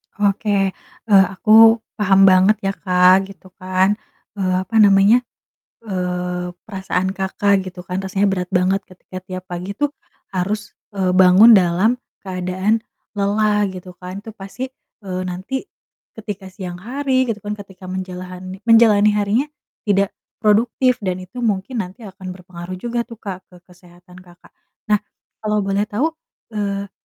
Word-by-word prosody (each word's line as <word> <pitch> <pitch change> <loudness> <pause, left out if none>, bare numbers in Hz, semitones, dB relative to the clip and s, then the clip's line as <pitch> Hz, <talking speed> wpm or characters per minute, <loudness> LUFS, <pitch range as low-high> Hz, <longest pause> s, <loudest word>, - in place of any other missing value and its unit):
Oke, 200 -1 +1 0.4
eee, 195 -2 +6
aku 225 +3 +6 0.2
paham 195 -2 +4
banget 185 +3 +5
ya, 195 - +1
Kak, 185 0 +4
gitu 190 -1 -15
kan, 185 +2 +1 0.4
eee, 185 -1 0
apa 225 - -8
namanya, 200 +3 +6 0.6
eee, 180 -3 -3
perasaan 190 -2 -2
Kakak, 195 0 +1
gitu 180 -1 -8
kan, 180 0 -5
rasanya 195 +1 +1
berat 180 -2 -2
banget 185 +2 +2
ketika 185 0 -12
tiap 185 0 -6
pagi 180 +3 -5
tuh 290 +5 0 0.4
harus, 200 +3 -3 0.2
eee, 190 -2 0
bangun 190 +5 +8
dalam 185 +7 +2 0.2
keadaan 185 +3 -1 0.4
lelah, 210 +1 +2
gitu 180 0 -9
kan, 185 +2 -8
itu 220 - -10
pasti, 215 +7 -7 0.3
eee, 185 -1 -4
nanti 190 - -4 0.5
ketika 210 -3 -7
siang 185 -2 -7
hari 260 +2 0
gitu 210 - -6
kan 210 0 -5
ketika 190 -2 -12
menjalahani 185 0 -7
menjalani 225 -2 +6
harinya 210 +7 +1 0.4
tidak 200 -1 +2 0.3
produktif 240 +4 +3
dan 185 -3 -2
itu 215 +7 -10
mungkin 225 +1 -1
nanti 190 +4 -6
akan 190 -2 -8
berpengaruh 180 0 -9
juga 235 +4 -3
tuh, 230 - -10
Kak, 190 -4 -7
ke 180 - -19
kesehatan 180 0 -18
Kakak. 180 -1 -19 0.4
Nah, 210 - +4 0.4
kalau 210 -1 0
boleh 195 +1 0
tahu, 270 +11 0 0.4
eee, 200 -2 -3
195 Hz, 140 wpm, -20 LUFS, 185-210 Hz, 0.6 s, bangun